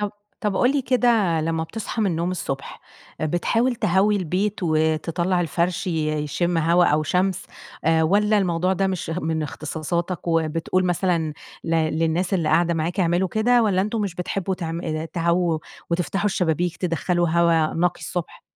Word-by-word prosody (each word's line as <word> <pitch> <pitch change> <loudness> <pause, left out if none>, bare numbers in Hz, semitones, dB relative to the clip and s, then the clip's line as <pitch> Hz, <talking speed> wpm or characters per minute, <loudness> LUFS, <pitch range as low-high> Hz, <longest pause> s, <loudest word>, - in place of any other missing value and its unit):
طَب 205 -1 -1 0.3
طَب 205 -3 -1
قُل 250 - +4
لي 280 -2 0
كده 235 -9 +2
لما 160 0 -1
بتصحى 220 +5 -4
من 200 - +2
النوم 170 +2 -1
الصبح، 135 -6 -5 0.4
بتحاول 225 +10 +1
تهوي 200 +1 +2
البيت 190 +3 -1
وتطلع 165 +3 +1
الفرش 175 +2 -1
ي 160 -3 0 0.2
يشم 170 +3 0
هوا 170 +2 +4
أو 150 0 +2
شمس 185 +4 0 0.4
آآ 160 0 +3
والّا 210 +5 +3
الموضوع 185 -1 +1
ده 195 +1 +1
مش 185 -3 -3
من 160 -2 -2
اختصاصاتك 165 +4 -3
وبتقول 165 +3 +1
مثلًا 175 -3 0 0.3
ل 165 - -3
للناس 165 +4 +1
اللي 165 -4 0
قاعدة 170 0 +3
معاك 165 +4 -1
اعملوا 175 +1 +2
كده، 235 +4 +3
والّا 190 -4 +2
أنتم 215 +3 -1
مش 200 -4 -2
بتحبوا 185 +1 -2
تعم 165 -1 -4
آآ 155 -2 -3
تهووا 170 0 0 0.3
وتفتحوا 180 +4 0
الشبابيك 175 -3 0
تدخّلوا 175 0 0
هوا 165 -1 +2
نقي 175 +1 0
الصبح؟ 175 -3 -5
175 Hz, 160 wpm, -23 LUFS, 165-190 Hz, 0.4 s, قُل